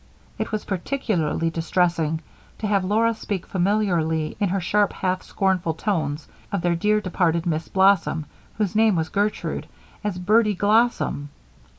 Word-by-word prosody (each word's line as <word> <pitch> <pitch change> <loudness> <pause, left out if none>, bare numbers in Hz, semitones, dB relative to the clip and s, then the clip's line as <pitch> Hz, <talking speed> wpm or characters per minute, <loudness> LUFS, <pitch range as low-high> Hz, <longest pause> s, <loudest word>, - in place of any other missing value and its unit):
It - - -2
was 215 -1 -3
particularly 175 - -1
distressing 165 -1 0 0.4
to - - -4
have 200 -2 +2
Laura 225 +4 +2
speak 205 -4 -4
familiarly 175 -5 0
in 200 - +1
her 195 +2 0
sharp, 205 +3 +1
half 185 0 -1
scornful 185 -5 0
tones, 155 -6 -2 0.2
of 200 - -1
their 175 -1 +2
dear, 210 +5 +2
departed 175 -3 0
Miss 160 -1 -1
Blossom, 190 -5 +3 0.3
whose 210 -2 -1
name 220 -2 +4
was 160 -1 -1
Gertrude, 205 +4 -1 0.4
as 205 -3 -2
Bertie 210 +3 +3
Glossom. 210 -8 +1
185 Hz, 145 wpm, -23 LUFS, 165-210 Hz, 0.4 s, name